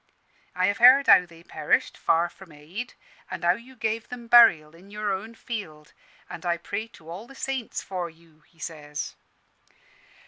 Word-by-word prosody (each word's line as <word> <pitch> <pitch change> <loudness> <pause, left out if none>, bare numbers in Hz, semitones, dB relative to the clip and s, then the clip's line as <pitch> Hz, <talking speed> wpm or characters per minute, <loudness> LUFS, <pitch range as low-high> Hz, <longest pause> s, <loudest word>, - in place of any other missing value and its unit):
I 185 0 +2
have 200 +1 0
heard 260 +4 +8
how 180 -2 +6
they 165 0 -16
perished, 155 -3 0
far 170 +1 +2
from 180 0 -16
aid, 170 +12 -8 0.3
and 170 - -6
how 175 - +5
you 235 +7 -6
gave 225 -1 -2
'em 245 -1 -7
burial 225 -11 +6
in 185 +4 -17
your 210 0 -3
own 220 +4 -6
field: 160 -12 -7 0.3
and - - -9
I 175 -1 0
pray 200 +6 -5
to 160 - -18
all 185 +8 -8
the 275 - -14
saints 265 -3 -4
for 180 -3 -4
you,' 165 -1 -22
he 165 - -30
says. 150 -2 -6
185 Hz, 175 wpm, -26 LUFS, 165-230 Hz, 0.3 s, heard